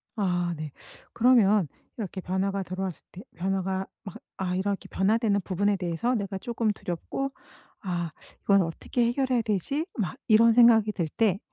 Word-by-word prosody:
아 180 Hz, -4 st, 0 dB
네. 155 Hz, -2 st, -6 dB, 0.4 s
그러면 215 Hz, -6 st, +4 dB, 0.3 s
이렇게 195 Hz, -3 st, -5 dB
변화가 195 Hz, +2 st, -1 dB
들어왔을 185 Hz, -1 st, -5 dB
때 185 Hz, -, -10 dB
변화가 190 Hz, +1 st, -1 dB, 0.2 s
막 195 Hz, -, -9 dB, 0.3 s
아 180 Hz, -1 st, -1 dB
이렇게 195 Hz, +1 st, -2 dB
변화되는 210 Hz, +1 st, +2 dB
부분에 200 Hz, +2 st, 0 dB
대해서 185 Hz, +7 st, -1 dB
내가 195 Hz, -2 st, -3 dB
조금 230 Hz, 0 st, -1 dB
두렵고 205 Hz, +8 st, -4 dB, 0.5 s
'아 175 Hz, -4 st, -3 dB, 0.3 s
이건 200 Hz, -1 st, +4 dB
어떻게 175 Hz, +8 st, -1 dB
해결해야 250 Hz, 0 st, +1 dB
되지?' 220 Hz, -, -1 dB
막 195 Hz, -, -1 dB
이런 230 Hz, +1 st, +6 dB
생각이 225 Hz, -2 st, +6 dB
들 170 Hz, -6 st, -1 dB
때 200 Hz, +1 st, +1 dB
195 Hz, 320 characters per minute, -27 LUFS, 185-225 Hz, 0.5 s, 이런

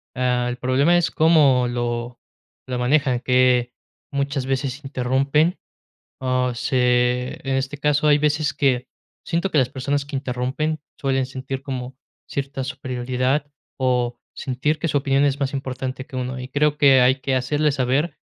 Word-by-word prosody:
Ah, 125 Hz, -1 st, +1 dB
el 125 Hz, -, -4 dB
problema 135 Hz, +7 st, +3 dB
es 175 Hz, -2 st, +1 dB
cómo 145 Hz, -6 st, +4 dB
lo 120 Hz, 0 st, -3 dB, 0.5 s
lo 125 Hz, -1 st, -2 dB
manejan, 130 Hz, 0 st, +2 dB
que 125 Hz, -1 st, +2 dB, 0.4 s
muchas 140 Hz, -1 st, -1 dB
veces 135 Hz, +1 st, -2 dB
interrumpen, 140 Hz, +5 st, +1 dB, 0.6 s
ah, 130 Hz, -1 st, +1 dB
se 125 Hz, 0 st, +1 dB
en 135 Hz, -, +1 dB
este 135 Hz, +2 st, -2 dB
caso 150 Hz, 0 st, +1 dB
hay 145 Hz, 0 st, +5 dB
veces 150 Hz, -1 st, +1 dB
que 135 Hz, -3 st, +1 dB, 0.4 s
siento 170 Hz, +3 st, 0 dB
que 155 Hz, -, +2 dB
las 125 Hz, -, +2 dB
personas 140 Hz, +2 st, -2 dB
que 145 Hz, -1 st, -7 dB
interrumpen 130 Hz, +4 st, -2 dB, 0.2 s
suelen 135 Hz, -1 st, 0 dB
sentir 130 Hz, 0 st, -5 dB
como 130 Hz, -1 st, -5 dB, 0.3 s
cierta 135 Hz, -1 st, -3 dB
superioridad, 130 Hz, +2 st, -2 dB, 0.3 s
o 125 Hz, -2 st, 0 dB, 0.2 s
sentir 140 Hz, +4 st, -1 dB
que 165 Hz, -, -1 dB
su 145 Hz, -, +2 dB
opinión 135 Hz, 0 st, +2 dB
es 140 Hz, 0 st, 0 dB
más 140 Hz, -1 st, -1 dB
importante 130 Hz, -1 st, -4 dB
que 130 Hz, -, -11 dB
uno, 130 Hz, 0 st, -3 dB
y 125 Hz, -, -6 dB
creo 150 Hz, +2 st, +1 dB
que 135 Hz, -3 st, +6 dB
hay 130 Hz, +2 st, +3 dB
que 135 Hz, -1 st, 0 dB
hacerle 145 Hz, +4 st, +1 dB
saber 135 Hz, +4 st, 0 dB
130 Hz, 155 wpm, -22 LUFS, 125-145 Hz, 0.6 s, que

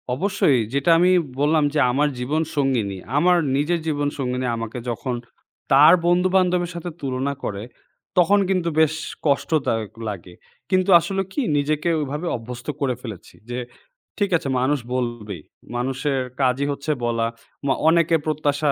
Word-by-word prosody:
অবশ্যই, 165 Hz, -5 st, +2 dB
যেটা 140 Hz, +4 st, +1 dB
আমি 180 Hz, +1 st, +4 dB, 0.3 s
বললাম, 150 Hz, +2 st, +3 dB
যে 155 Hz, -, +1 dB
আমার 145 Hz, +4 st, +2 dB
জীবন 145 Hz, +6 st, 0 dB
সঙ্গিনী, 125 Hz, -9 st, 0 dB, 0.2 s
আমার 180 Hz, +4 st, +4 dB, 0.2 s
নিজের 155 Hz, +5 st, +1 dB
জীবন 145 Hz, -2 st, 0 dB
সঙ্গিনী 125 Hz, -2 st, -2 dB
আমাকে 115 Hz, +1 st, -5 dB
যখন 120 Hz, +2 st, -3 dB, 0.6 s
তার 140 Hz, +3 st, +8 dB
বন্ধু-বান্ধবের 180 Hz, 0 st, +2 dB
সাথে 170 Hz, +1 st, -5 dB
তুলনা 135 Hz, 0 st, -2 dB
করে 100 Hz, 0 st, -4 dB, 0.5 s
তখন 190 Hz, +3 st, +5 dB
কিন্তু 180 Hz, -3 st, +1 dB
বেশ 160 Hz, -1 st, +4 dB, 0.3 s
কষ্টদায়ক 140 Hz, -, 0 dB, 0.2 s
লাগে। 90 Hz, -3 st, -8 dB, 0.4 s
কিন্তু 185 Hz, 0 st, +2 dB
আসলে 195 Hz, +3 st, -2 dB
কি 290 Hz, -, 0 dB, 0.2 s
নিজেকে 150 Hz, +3 st, 0 dB
ওইভাবে 150 Hz, +4 st, -3 dB
অভ্যস্ত 120 Hz, +1 st, -9 dB
করে 130 Hz, -3 st, +1 dB
ফেলেছি, 110 Hz, -8 st, -9 dB
যে 125 Hz, +1 st, -3 dB, 0.6 s
ঠিক 205 Hz, -2 st, +1 dB
আছে 150 Hz, -, -6 dB
মানুষ 140 Hz, +3 st, +1 dB, 0.2 s
বলবেই 120 Hz, -8 st, -4 dB, 0.3 s
মানুষের 135 Hz, +3 st, -1 dB, 0.2 s
কাজই 130 Hz, +1 st, +2 dB
হচ্ছে 140 Hz, +2 st, -3 dB
বলা। 115 Hz, -1 st, 0 dB, 0.4 s
ম -, -, 0 dB, 0.2 s
অনেকের 170 Hz, 0 st, +3 dB
প্রত্যাশা 150 Hz, -1 st, +1 dB
145 Hz, 140 wpm, -22 LUFS, 125-165 Hz, 0.6 s, তার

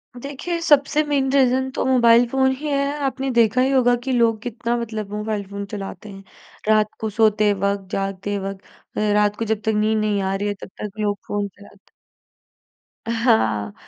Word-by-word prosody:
देखिए, 285 Hz, +7 st, -4 dB
सबसे 295 Hz, -1 st, +3 dB
main 280 Hz, -3 st, 0 dB
reason 265 Hz, -1 st, +3 dB
तो -, -, -2 dB
मोबाइल 240 Hz, -2 st, +5 dB
फ़ोन 265 Hz, 0 st, +2 dB
ही 300 Hz, +3 st, -6 dB
है, 280 Hz, 0 st, 0 dB
आपने 270 Hz, 0 st, -2 dB
देखा 235 Hz, +1 st, +3 dB
ही 265 Hz, +1 st, +2 dB
होगा 245 Hz, -2 st, +4 dB
कि 265 Hz, -, -2 dB
लोग 230 Hz, -3 st, +2 dB
कितना 240 Hz, 0 st, -3 dB
मतलब 220 Hz, -3 st, -4 dB
मोबाइल 210 Hz, -1 st, -2 dB
फ़ोन 200 Hz, 0 st, -6 dB
चलाते 205 Hz, +1 st, -7 dB
हैं। 195 Hz, 0 st, -11 dB, 0.5 s
रात 215 Hz, -1 st, +3 dB
को 220 Hz, -, -2 dB
सोते 215 Hz, -1 st, +3 dB
वक़्त, 200 Hz, 0 st, -2 dB
जागते 195 Hz, +1 st, -2 dB
वक़्त, 195 Hz, 0 st, -6 dB, 0.4 s
रात 210 Hz, 0 st, +2 dB
को 230 Hz, -, -1 dB
जब 220 Hz, -1 st, -1 dB
तक 220 Hz, -, +2 dB
नींद 215 Hz, +1 st, +2 dB
नहीं 210 Hz, -2 st, 0 dB
आ 190 Hz, 0 st, -1 dB
रही 205 Hz, +1 st, -2 dB
है 205 Hz, -, -1 dB
तब -, -, -8 dB
तक 210 Hz, -, -3 dB
लोग 205 Hz, -1 st, 0 dB
फ़ोन 205 Hz, -1 st, -2 dB
चलाते। 205 Hz, +1 st, -17 dB, 1.3 s
हाँ, 225 Hz, -, +1 dB
220 Hz, 180 wpm, -21 LUFS, 205-255 Hz, 1.3 s, मोबाइल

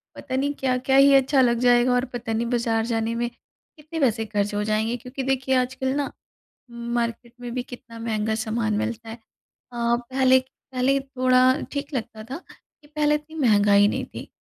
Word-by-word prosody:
पता 260 Hz, -2 st, -5 dB
नहीं 285 Hz, +2 st, 0 dB
क्या-क्या 260 Hz, 0 st, +1 dB
ही 275 Hz, 0 st, +7 dB
अच्छा 270 Hz, 0 st, +4 dB
लग 235 Hz, -2 st, +3 dB
जाएगा 245 Hz, 0 st, +4 dB
और 250 Hz, +1 st, +1 dB
पता 240 Hz, -2 st, -5 dB
नहीं 225 Hz, +2 st, 0 dB
बाज़ार 230 Hz, -2 st, 0 dB
जाने 230 Hz, -1 st, -1 dB
में 240 Hz, 0 st, -1 dB
कितने 305 Hz, +6 st, -12 dB
पैसे 225 Hz, -5 st, +1 dB
खर्च 205 Hz, -1 st, -1 dB
हो 210 Hz, -, 0 dB
जाएँगे। 215 Hz, +2 st, 0 dB
क्योंकि 250 Hz, +3 st, -6 dB
देखिए 265 Hz, 0 st, 0 dB
आजकल 260 Hz, +1 st, 0 dB
ना 285 Hz, -1 st, -1 dB, 0.6 s
मार्केट 235 Hz, 0 st, -3 dB
में 245 Hz, -1 st, -6 dB
भी 250 Hz, -, -2 dB
कितना 230 Hz, -2 st, -11 dB
महँगा 220 Hz, -1 st, -1 dB
सामान 220 Hz, 0 st, -1 dB
मिलता 230 Hz, +1 st, -3 dB
है। 225 Hz, -, -6 dB, 0.4 s
अ, 235 Hz, -1 st, -2 dB
पहले-पहले 260 Hz, 0 st, +1 dB
थोड़ा 255 Hz, 0 st, +3 dB
ठीक 285 Hz, +1 st, -4 dB
लगता 220 Hz, -3 st, -5 dB
था -, -, -3 dB, 0.5 s
कि -, -, -19 dB
पहले 300 Hz, 0 st, +1 dB
इतनी 300 Hz, +2 st, -5 dB
महँगाई 205 Hz, -1 st, +5 dB
नहीं -, -, -2 dB
थी -, -, -7 dB
245 Hz, 175 wpm, -24 LUFS, 230-265 Hz, 0.6 s, ही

